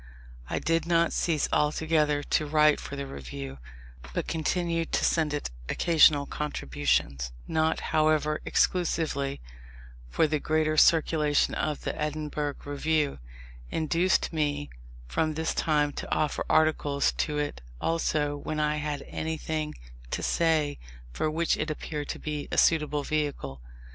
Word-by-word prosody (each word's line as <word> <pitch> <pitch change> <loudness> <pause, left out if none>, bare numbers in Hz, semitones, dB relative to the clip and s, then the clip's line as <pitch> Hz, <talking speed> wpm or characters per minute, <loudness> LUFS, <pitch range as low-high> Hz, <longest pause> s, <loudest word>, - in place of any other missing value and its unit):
I - - -1
did 165 0 0
not 170 -1 +3
cease 160 -4 +1
altogether 150 -1 +2
to 155 - 0
write 150 0 +4
for 140 - -7
the 140 0 -4
Review, 70 - -7 0.6
but - - -1
continued 165 +1 -1
to - - +2
send 160 -3 +2
it 145 - -3 0.2
occasional 155 -4 +5
contributions, 65 - -1 0.2
not, 160 0 +1
however, 155 -1 +2
exclusively; 155 -6 0 0.7
for - - +2
the 155 -1 0
greater 155 +1 +1
circulation 155 -2 +4
of 150 -2 -2
the - - -2
Edinburgh 150 -1 -2
Review 145 +1 0 0.5
induced 165 +4 +1
me 145 -2 -1 0.3
from 155 - -1
this 160 +1 -1
time 150 -2 +1
to - - -7
offer 150 -2 0
articles 150 -3 +3
to 150 -2 0
it 145 - -2 0.2
also 155 -3 0
when 155 +1 -4
I 150 0 +1
had 145 -2 -3
anything 155 -1 -3 0.3
to - - -3
say 155 -3 +1 0.3
for 155 - 0
which 165 +2 +1
it 155 - -2
appeared 150 -1 -4
to - - -3
be 150 -1 -4
a - - -2
suitable 150 -3 +3
vehicle. 140 - -2
150 Hz, 135 wpm, -28 LUFS, 145-160 Hz, 0.7 s, occasional